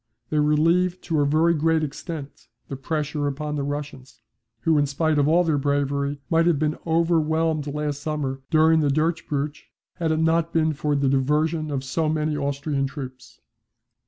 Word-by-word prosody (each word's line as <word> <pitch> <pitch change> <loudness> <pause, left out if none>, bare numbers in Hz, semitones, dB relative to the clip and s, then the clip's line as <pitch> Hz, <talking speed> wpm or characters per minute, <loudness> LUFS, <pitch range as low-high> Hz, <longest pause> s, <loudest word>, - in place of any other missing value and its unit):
They 155 - +2
relieve 165 +5 +2
to 160 -3 -1
a 145 - +2
very 160 +3 +3
great 160 0 +1
extent 150 0 -7 0.2
the 135 - -4
pressure 150 +1 -2
upon 150 +2 -3
the 145 - -2
Russians, 140 -3 -6 0.4
who, 160 +3 +3
in 145 - +2
spite 155 +2 +1
of 145 - +3
all 170 +3 +4
their 155 -4 +1
bravery, 140 0 0
might 165 0 +2
have 170 -4 +3
been 150 +1 -1
overwhelmed 160 -2 +1
last 145 0 -3
summer 145 -3 -3
during 160 0 +4
the 150 -2 +2
'durchbruch' 150 -1 -1 0.3
had 165 -3 0
it 160 - +1
not 165 +1 +1
been 160 -1 +2
for 150 0 -1
the 140 -1 +1
diversion 150 +4 +1
of 135 -2 -2
so 155 +4 -1
many 155 0 0
Austrian 140 0 -1
troops. 130 -4 -9
150 Hz, 170 wpm, -24 LUFS, 140-160 Hz, 0.4 s, all